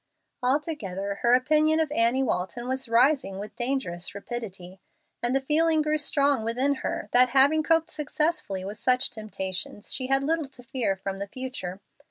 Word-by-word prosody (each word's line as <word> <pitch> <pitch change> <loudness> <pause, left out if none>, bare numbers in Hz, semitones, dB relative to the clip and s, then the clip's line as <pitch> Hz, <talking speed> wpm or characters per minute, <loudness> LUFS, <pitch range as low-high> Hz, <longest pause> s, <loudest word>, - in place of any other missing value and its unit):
Altogether, 245 - -2
her 240 +1 +5
opinion 305 +4 +3
of 315 -2 0
Annie 245 0 +2
Walton 240 +2 -2
was 260 -2 -3
rising 250 -3 +3
with 205 +2 -7
dangerous 240 -9 -3
rapidity; 195 -4 -7 0.4
and 240 +2 +1
the - - +4
feeling 310 +3 +2
grew 305 0 +1
strong 280 -4 +2
within 250 +5 +1
her - - -3
that, 250 +1 +6
having 285 +4 +6
coped 325 +1 +2
successfully 300 - -2
with 205 +2 -6
such 255 +3 +2
temptations, 205 -2 -4
she 255 - -1
had 270 +1 +2
little 315 0 0
to 260 -2 -12
fear 245 -6 -1
from 195 0 -5
the 200 - -4
future. 205 -6 -6
255 Hz, 165 wpm, -26 LUFS, 200-290 Hz, 0.4 s, that